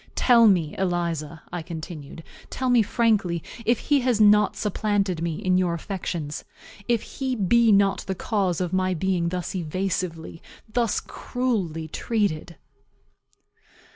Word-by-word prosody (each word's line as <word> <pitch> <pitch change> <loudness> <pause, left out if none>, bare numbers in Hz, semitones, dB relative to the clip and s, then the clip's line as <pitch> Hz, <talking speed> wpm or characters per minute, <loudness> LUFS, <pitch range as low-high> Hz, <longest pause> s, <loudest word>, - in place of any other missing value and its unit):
"Tell 235 -3 +6
me, 170 -7 +2
Eliza," 170 -4 -2
I 175 - -2
continued, 160 -2 -8 0.3
"tell 260 -1 -1
me 245 -2 +6
frankly, 205 -7 +1 0.2
if 235 0 +4
he 290 -1 +2
has 245 -3 +1
not 210 -1 +5
supplanted 205 -4 0
me 165 -2 -1
in 185 +2 +1
your 175 -2 +1
affections 170 -4 -4 0.4
if 235 -2 +1
he 260 -2 -3
be 230 +2 +4
not 200 -1 +4
the 190 - -2
cause 190 -3 -1
of 180 -1 -2
my 185 0 +1
being 175 0 0
thus 180 -1 -4
evasively, 175 -1 -3 0.3
thus 230 0 0
cruelly, 195 -11 -3
treated." 175 -3 -2
185 Hz, 135 wpm, -24 LUFS, 170-215 Hz, 0.4 s, Tell